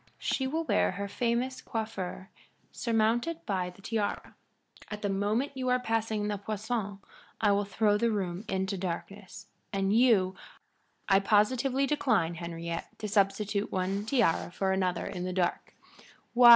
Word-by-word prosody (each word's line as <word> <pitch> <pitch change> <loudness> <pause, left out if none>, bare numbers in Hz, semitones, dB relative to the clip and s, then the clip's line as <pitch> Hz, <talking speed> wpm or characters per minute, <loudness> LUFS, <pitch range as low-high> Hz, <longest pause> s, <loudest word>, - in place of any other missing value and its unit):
She 265 - 0
will 320 +5 -1
wear 310 - +2
her 200 +2 -3
famous 245 +4 -1
coiffure 195 -5 -4 0.4
surmounted 235 +8 0
by 185 -3 -1
the 180 +2 -16
tiara. 215 -2 -2 0.6
At 210 0 -6
the 205 - +1
moment 205 +7 0
you 260 -1 -2
are 250 0 +3
passing 225 -3 0
the 205 -1 -2
poisson 210 0 -3 0.4
I 210 -2 +4
will 200 0 +2
throw 205 +1 +2
the 235 +1 +3
room 190 -3 -2
into 190 0 -1
darkness, 190 +2 -5 0.3
and 195 0 +1
you 220 -6 +5 0.4
" - - -42
"I 195 - +6
positively 250 +7 +3
decline, 230 - +2
Henriette, 170 0 -5
to 215 - -4
substitute 200 0 +1
one 190 +2 -1
tiara 225 -10 +2
for 190 +2 -1
another 185 -2 0
in 180 -3 -4
the 185 0 -2
dark. 180 -1 -1
205 Hz, 150 wpm, -30 LUFS, 190-230 Hz, 0.6 s, I